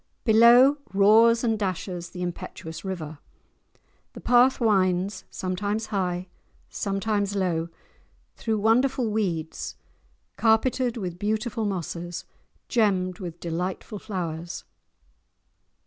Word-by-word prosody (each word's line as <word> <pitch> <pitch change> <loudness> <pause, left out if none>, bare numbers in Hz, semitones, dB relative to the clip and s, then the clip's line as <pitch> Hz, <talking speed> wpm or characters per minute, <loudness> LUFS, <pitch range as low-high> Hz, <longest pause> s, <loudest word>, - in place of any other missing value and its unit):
Below 240 +4 +7 0.2
roars 225 +4 +6
and 225 -2 +1
dashes 185 -3 -3
the 180 -1 -6
impetuous 165 -2 -6
river; 160 -6 -5 0.9
the - - -9
path 250 +2 +4
winds, 195 -3 +1
sometimes 205 +4 -2
high, 180 -2 -1 0.4
sometimes 200 0 -1
low, 170 -4 0 0.7
through 225 -3 -1
wonderful 240 +4 +2
weeds, 175 -7 -2 0.6
carpeted 235 +2 +2
with 180 -5 -5
beautiful 215 +2 -1
mosses, 175 -3 -4 0.4
gemmed 190 -5 +1
with 175 -3 -7
delightful 180 +5 -4
flowers. 170 -5 -5
200 Hz, 95 wpm, -25 LUFS, 180-225 Hz, 0.9 s, Below